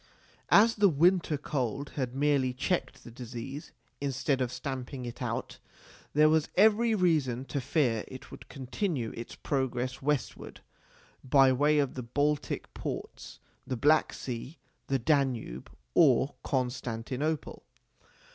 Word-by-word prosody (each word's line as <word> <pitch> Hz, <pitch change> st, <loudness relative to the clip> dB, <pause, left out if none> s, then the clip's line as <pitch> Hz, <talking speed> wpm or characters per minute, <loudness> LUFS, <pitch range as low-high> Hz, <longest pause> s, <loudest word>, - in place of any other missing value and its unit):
As 225 Hz, +2 st, +6 dB
the 205 Hz, -1 st, +5 dB
winter 170 Hz, 0 st, +3 dB
cold 140 Hz, -1 st, -3 dB
had 130 Hz, -3 st, -3 dB
merely 140 Hz, -2 st, +2 dB
checked 170 Hz, +7 st, -2 dB
the 120 Hz, -, -11 dB
disease, 125 Hz, +4 st, -7 dB, 0.3 s
instead 135 Hz, 0 st, -1 dB
of 125 Hz, -1 st, -1 dB
stamping 130 Hz, -1 st, -5 dB
it 120 Hz, -, -8 dB
out, -, -, -4 dB, 0.5 s
there 150 Hz, +1 st, +6 dB
was 155 Hz, 0 st, +2 dB
every 220 Hz, +3 st, +4 dB
reason 150 Hz, -, +1 dB
to 140 Hz, 0 st, -3 dB
fear 120 Hz, -5 st, +1 dB
it 130 Hz, -, -11 dB
would -, -, -12 dB
continue 135 Hz, -, -3 dB
its 115 Hz, -, -7 dB
progress 130 Hz, -2 st, -2 dB
westward, 145 Hz, -2 st, -2 dB, 0.6 s
by 135 Hz, 0 st, +5 dB
way 150 Hz, +3 st, +3 dB
of 140 Hz, -3 st, +1 dB
the 130 Hz, -, -5 dB
Baltic 145 Hz, +5 st, -1 dB
ports, -, -, -6 dB, 0.3 s
the 130 Hz, -, -2 dB
Black 150 Hz, +6 st, +4 dB
Sea, 130 Hz, +5 st, -6 dB, 0.3 s
the 135 Hz, -, +1 dB
Danube, 130 Hz, -, 0 dB, 0.2 s
or 135 Hz, -, +4 dB
Constantinople. 130 Hz, +3 st, -2 dB
135 Hz, 130 wpm, -29 LUFS, 125-150 Hz, 0.6 s, As